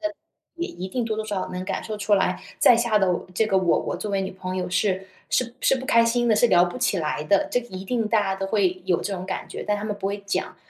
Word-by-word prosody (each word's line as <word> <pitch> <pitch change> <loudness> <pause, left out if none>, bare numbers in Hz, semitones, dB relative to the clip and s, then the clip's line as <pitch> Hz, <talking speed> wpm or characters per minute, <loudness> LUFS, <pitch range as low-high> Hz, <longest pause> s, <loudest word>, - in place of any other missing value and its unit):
的 315 -1 -2 0.4
也 340 +1 -3
一 190 - -6
定 240 +4 -2
多 220 -1 -2
多 220 - -2
少 205 -3 -2
少 - - -5
能 180 0 -4
感 - - -3
受 215 -1 -4
出 205 0 +2
来 185 -2 0 0.2
在 245 - +7
下 230 -2 +2
的 190 -2 +2
我 175 - -3
这 220 +2 +2
个 195 - +1
我 180 -3 +3
我 - - -3
作 205 +3 -4
为 195 -1 +1
女 190 0 -3
朋 185 0 -5
友 180 -1 -2
是 190 0 0 0.2
是 240 -1 0
是 270 - +3
不 260 0 -6
开 230 0 +5
心 240 +1 +1
的， 220 - +4
是 240 +3 +4
聊 175 -3 +6
不 175 - -5
起 195 - +1
来 150 -1 -2
的。 200 +5 +3
这 245 - +2
个 240 - -13
一 190 +1 -7
定 225 0 -1
大 220 -1 +3
家 195 -1 0
都 195 0 -3
会 185 -3 +1
有 175 - +2
这 200 - -3
种 185 0 -5
感 190 - -4
觉， - - -6
但 210 0 +1
他 205 - -5
们 210 -1 -3
不 195 -1 -3
会 200 +1 -3
讲。 195 - -2
200 Hz, 325 characters per minute, -24 LUFS, 185-225 Hz, 0.4 s, 在